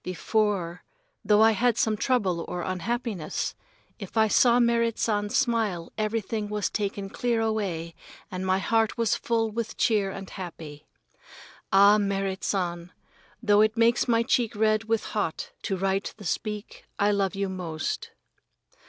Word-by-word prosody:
Before, 185 -1 -1 0.4
though 210 0 +5
I 225 - +6
had 230 +2 +1
some 220 -1 +2
trouble 200 -8 0
or 175 -1 -4
unhappiness, 195 -2 -3 0.5
if 200 +1 -8
I 220 0 +5
saw 240 +3 +4
Merrit 235 -1 +2
San's 205 -2 0
smile 225 -9 0
everything 215 -1 -2
was 210 -1 -1
taken 200 -1 -2
clear 235 +3 -1
away 195 -7 -2 0.4
and 185 0 -4
my 190 0 +2
heart 225 +3 +1
was 230 -2 +2
full 225 -1 0
with 230 +1 -4
cheer 210 -4 +2
and 195 0 -7
happy. 160 -6 -9 0.8
Ah, 200 +2 +6
Merrit 195 -1 -1
San, 175 -2 -2 0.5
though 205 -1 +5
it 215 +1 +2
makes 235 +2 +3
my 230 -1 +3
cheek 235 -2 +1
red 215 +1 +2
with 225 0 0
hot 205 -7 -3
to 195 - -2
write 195 +1 -1
the 205 - -11
speak, 210 +4 -4
I 205 0 +3
love 200 -1 0
you 195 0 -1
most. 175 -5 -4
210 Hz, 150 wpm, -26 LUFS, 190-225 Hz, 0.8 s, I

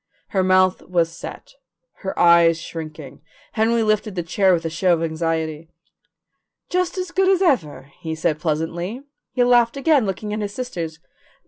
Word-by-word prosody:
Her 190 -2 +1
mouth 185 0 +3
was 170 -2 0
set, - - -10 0.4
her 190 - -5
eyes 170 -1 +5
shrinking. 155 -4 -8 0.3
Henry 230 +1 +2
lifted 215 -1 0
the 175 - -2
chair 190 +3 +2
with 165 -2 +1
a - - 0
show 180 +2 +2
of 165 -1 0
anxiety. 160 -1 -2 1.0
"Just 365 +1 -1
as 365 -1 -3
good 380 +1 +2
as 385 0 +3
ever," 160 - 0
he 160 -1 -4
said 155 -1 -1
pleasantly. 170 - -3 0.3
He 250 - +2
laughed 240 0 +3
again, 275 -5 +3
looking 210 +2 -4
at 215 - -2
his 205 -1 -4
sisters. 175 -11 -5
185 Hz, 160 wpm, -21 LUFS, 165-235 Hz, 1.0 s, eyes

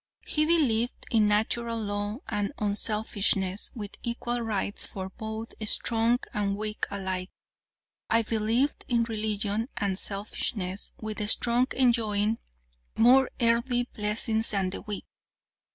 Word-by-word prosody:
"'He 305 0 +1
believed 245 -8 +2
in 220 -2 +4
Natural 230 +2 +1
Law 205 +3 -3
and 205 -1 -1
unselfishness, 205 -2 0
with 210 -3 -6
equal 240 0 -2
rights 210 -3 -1
for 190 -1 -5
both 220 +2 -6
strong 230 +2 +3 0.2
and 200 -1 0
weak 215 0 -2
alike. 190 -2 -3 0.8
I 230 0 +4
believed 225 +6 0
in 235 -2 +2
religion 215 0 -1
and 195 -2 0
selfishness, 200 -1 -3
with 215 0 -5
the 210 - -1
strong 240 +3 +4
enjoying 225 -4 +2 0.6
more 255 +3 +6
earthly 235 +1 +3
blessings 220 +1 +2
than 195 -3 0
the - - -5
weak. 210 -2 -6
220 Hz, 120 wpm, -28 LUFS, 205-235 Hz, 0.8 s, more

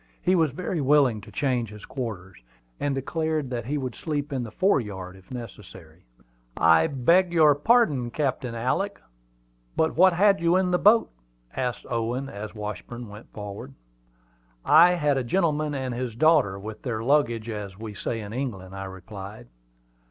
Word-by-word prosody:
He 185 - +1
was 165 -4 +3
very 175 +1 -3
willing 135 -6 +3
to 105 - -13
change 125 0 -1
his 105 0 -11
quarters, 110 -8 -6 0.4
and 145 -1 -1
declared 155 0 -2
that 120 -2 -3
he 145 +2 -1
would 130 -3 -3
sleep 145 0 -3
on 130 - -1
the 120 - -5
fore 185 - +2
yard, 95 -4 -7
if 95 -1 -18
necessary. 95 -9 -10 0.5
"I 80 0 +5
beg 170 +7 +3
your 155 -3 +6
pardon, 145 - +2
Captain 130 -3 -2
Alick, 160 - -1 0.8
but 160 0 +1
what 185 +2 +6
had 195 +2 +4
you 170 +1 +2
in 185 -1 +2
the 180 - +2
boat?" 220 +3 +5 0.4
asked 125 -2 -3
Owen, 120 +3 -2
as 105 +2 -8
Washburn 105 +3 -6
went 105 +2 -12
forward. 105 +6 -8 0.9
"I 175 +4 +7
had 145 -5 +1
a - - -2
gentleman 150 +1 0
and 130 -2 -3
his 120 -2 -4
daughter, 145 -9 +3
with 110 +2 -8
their 115 -4 -3
luggage, 120 -5 +1
as 105 -4 -6
we 110 -1 -7
say 115 +3 -4
in 105 0 -8
England," 100 -8 -5
I 95 0 -5
replied. 95 - -9
125 Hz, 165 wpm, -25 LUFS, 105-150 Hz, 0.9 s, I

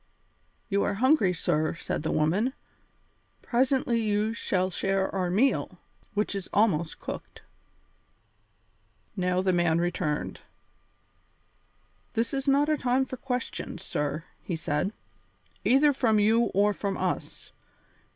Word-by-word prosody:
"You 200 -2 +1
are 205 - 0
hungry, 250 -4 +4
sir," 165 -3 0
said - - -3
the 155 - -2
woman; 190 +12 +1 0.9
"presently 250 -1 +1
you 215 0 +1
shall 185 -4 0
share 195 +1 0
our 185 -2 0
meal, 225 +10 +1 0.4
which 210 0 0
is 195 -2 -4
almost 180 -7 +1
cooked." - - -8 1.7
Now 180 -1 +1
the 185 -1 +2
man 175 -2 +3
returned. 170 -3 -2 1.7
"This 230 +2 -1
is 270 0 -2
not 280 +2 +4
a 305 -1 +1
time 255 +1 +2
for 260 - -7
questions, 250 -1 -4
sir," 150 +2 -2 0.2
he 175 - -3
said, 160 +4 -1 0.7
"either 275 +7 +5
from 230 -5 +2
you 220 +3 +4
or 205 0 +2
from 200 -1 -3
us. - - -3
205 Hz, 120 wpm, -27 LUFS, 180-245 Hz, 1.7 s, either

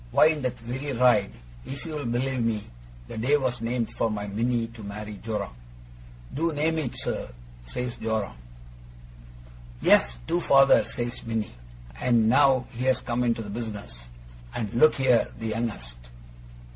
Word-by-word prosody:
Why, 155 - +6
in 155 -2 -1
that 125 -1 -2
very 130 +4 -4
ride, 120 -5 +4 0.3
if 135 - -7
you'll 150 -3 -4
believe 125 +2 0
me, 110 -2 0 0.4
the - - -6
day 135 +6 +3
was 125 -4 -1
named 115 0 -1
for 115 - 0
my 105 -1 -3
Minnie 115 +3 0
to 115 -1 -12
marry 105 +1 -6
Joram. 105 - -3 0.8
"Do 165 +4 0
name 160 +2 +1
it, 130 -6 -3
sir," - - -2 0.4
says 125 - -4
Joram. 110 - -2 1.4
"Yes, - - +4
do, 175 - +1
father," 135 -4 +6
says 120 +1 -4
Minnie. 115 - -3 0.5
And 115 -3 +3
now 130 0 +5
he's 130 +2 +1
come 120 +1 -1
into 115 -1 0
the 105 - -7
business. 100 - -6 0.5
And 105 -4 -3
look 155 +6 +5
here! 130 -3 +3
The 110 0 -4
youngest! 105 - -3
120 Hz, 150 wpm, -26 LUFS, 110-130 Hz, 1.4 s, Why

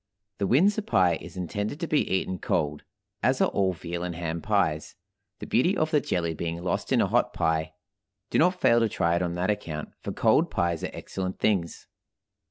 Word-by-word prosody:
The 100 - +1
Windsor 195 - +4
pie 90 - +2
is - - -10
intended 105 - -3
to 170 - -2
be 155 - +1
eaten 95 -1 -1
cold, 75 0 -1 0.4
as 130 +1 +2
are - - +3
all 95 -1 +1
veal 85 0 -5
and 90 -1 -3
ham 85 -1 -3
pies, 100 -8 0 0.4
the - - -7
beauty 175 - +2
of 155 0 0
the 150 -3 +3
jelly 85 -7 -1
being 85 +1 -4
lost 90 - -2
in - - +4
a - - +3
hot - - +1
pie. 80 0 0 0.6
Do - - +2
not 180 +3 +3
fail 120 0 +5
to 115 -1 +2
try 85 -3 +1
it 85 - 0
on 85 -1 -1
that 90 +4 +1
account, 80 -7 -4
for - - -4
cold - - +3
pies 85 -2 -1
are - - -2
excellent 95 -1 -5
things. 95 -6 0
90 Hz, 200 wpm, -27 LUFS, 85-115 Hz, 0.6 s, fail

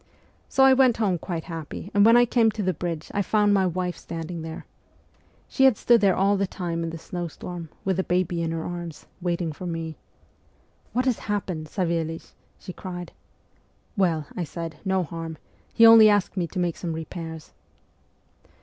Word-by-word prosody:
So 270 - +3
I 265 0 +8
went 260 -3 +4
home 195 -6 +1
quite 165 -1 -4
happy, 165 +3 -7
and 205 - +5
when 230 +2 +7
I 245 - +6
came 230 -1 +3
to 215 - -3
the 185 0 +1
bridge 170 -3 -5
I 200 - +1
found 205 +1 +2
my 190 -2 +3
wife 180 0 -2
standing 165 0 -6
there. 160 0 -7 0.8
She 265 - +3
had 260 -6 +5
stood 235 -2 +4
there 195 -3 +4
all 200 +1 +3
the 195 0 0
time 175 -3 -4
in 165 - -2
the 165 - -6
snowstorm, 175 0 -6 0.2
with 190 -2 +1
the 190 - +1
baby 180 -2 0
in 165 - -1
her 165 0 -3
arms, 175 -3 -6 0.2
waiting 175 -2 -1
for 180 +4 -7
me. 165 -2 -4 0.5
" - - -37
What 250 +2 +1
has 255 -4 +1
happened, 185 -6 -2
Savelich? 165 -2 -2
" - - -38
she 180 - -8
cried. 175 -2 -7 0.4
" - - -39
Well," 170 -7 +1
I 180 - -2
said, 165 0 -6
"no 190 -2 +1
harm; 165 -1 -6 0.3
he 230 - +6
only 225 -1 +9
asked 205 -2 +1
me 175 -3 -1
to 185 - -9
make 175 -2 0
some 170 -3 -4
repairs." 160 0 -7
175 Hz, 195 wpm, -25 LUFS, 165-200 Hz, 0.8 s, only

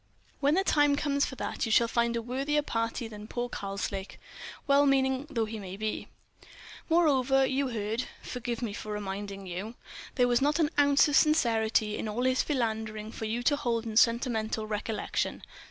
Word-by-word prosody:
"When 285 +2 +3
the 385 - +2
time 290 -6 +3
comes 280 -1 +1
for 260 - -7
that, 250 - -3
you - - -2
shall 235 +1 +5
find 235 0 +1
a 230 - -2
worthier 275 +5 0
parti 230 -1 -2
than 210 -1 -10
poor 240 +1 -3
Karslake, 195 -2 -5 0.5
well 285 0 +4
meaning 265 0 +2
though 230 -6 0
he 220 0 -6
may 190 -1 -7
be. 215 +1 -3 0.8
Moreover, 270 -5 +4
you 265 +1 0
heard—forgive 235 +2 -4
me 215 -4 -3
for 215 - -6
reminding 200 -1 -5
you—there 215 +6 -4
was 245 +1 +2
not 295 +3 +2
an 320 -2 +2
ounce 285 0 +5
of 295 - 0
sincerity 225 -9 +2
in - - -3
all 220 +4 -2
his 255 0 +3
philandering 220 -5 -2
for 220 - -6
you 230 +3 -2
to 290 - +3
hold 235 -4 -1
in 220 -1 -5
sentimental 225 -2 +2
recollection. 215 0 -3
235 Hz, 170 wpm, -29 LUFS, 215-275 Hz, 0.8 s, shall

